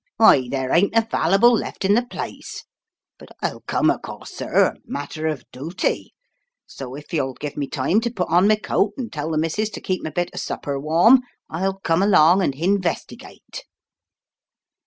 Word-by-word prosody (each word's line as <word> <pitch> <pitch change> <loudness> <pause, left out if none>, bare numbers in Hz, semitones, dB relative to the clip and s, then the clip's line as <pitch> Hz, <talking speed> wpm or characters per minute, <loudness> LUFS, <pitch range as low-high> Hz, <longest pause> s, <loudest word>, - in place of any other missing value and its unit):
"Why, 140 - +6
there 130 -1 -2
ain't 200 +6 +3
a 225 - +5
valyble 195 +9 +4
left 220 - -2
in 200 - +4
the 235 - +4
place. 245 - -7 0.5
But - - -14
I'll - - -3
come, - - +2
o* - - -3
course, - - -9
sir. - - +2
A - - -1
matter 155 +2 -5
o' 155 -2 -1 0.2
dooty. 155 +8 -3 0.6
So 130 -1 -9
if 150 +5 -12
you'll 135 -5 -1
give 150 -1 -6
me 145 -2 -3
time 150 +11 +1
to 235 - -1
put 185 -7 -3
on 175 +4 +4
my 215 - +5
coat 210 -1 0
and 245 -4 -6
tell 150 +1 -3
the 160 - -1
missus 165 +8 -1
to 215 - -8
keep 185 -1 -2
my - - -3
bit 175 +3 -2
of - - -5
supper 140 -1 -4
warm 170 - +5 0.3
I'll 190 +4 -2
come 165 0 +1
along 185 -2 +5
and 140 -7 0
hin 190 +7 +1
vestigate." 170 -3 -6
170 Hz, 190 wpm, -22 LUFS, 150-200 Hz, 0.6 s, Why